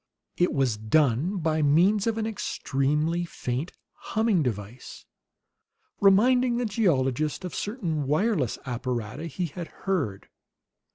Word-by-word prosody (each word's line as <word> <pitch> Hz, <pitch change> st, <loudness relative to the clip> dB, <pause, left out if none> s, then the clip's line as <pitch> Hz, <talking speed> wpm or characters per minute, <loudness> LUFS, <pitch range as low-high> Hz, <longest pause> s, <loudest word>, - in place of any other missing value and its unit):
It 175 Hz, -, +2 dB
was 130 Hz, -6 st, +1 dB
done 140 Hz, -, +2 dB
by 160 Hz, -2 st, 0 dB
means 180 Hz, +9 st, +3 dB
of 225 Hz, -1 st, 0 dB
an 220 Hz, -, -1 dB
extremely 155 Hz, -5 st, -1 dB
faint 140 Hz, -2 st, -4 dB, 0.2 s
humming 220 Hz, -5 st, 0 dB
device, 115 Hz, -2 st, -5 dB, 0.9 s
reminding 240 Hz, +5 st, +4 dB
the 245 Hz, -, 0 dB
geologist 155 Hz, -, 0 dB
of 180 Hz, -, -6 dB
certain 170 Hz, -, -2 dB
wireless 155 Hz, -, +1 dB
apparata 125 Hz, +2 st, -4 dB
he 165 Hz, +4 st, -3 dB
had 170 Hz, +2 st, -6 dB, 0.2 s
heard. 145 Hz, -, -1 dB
160 Hz, 115 wpm, -26 LUFS, 135-200 Hz, 0.9 s, reminding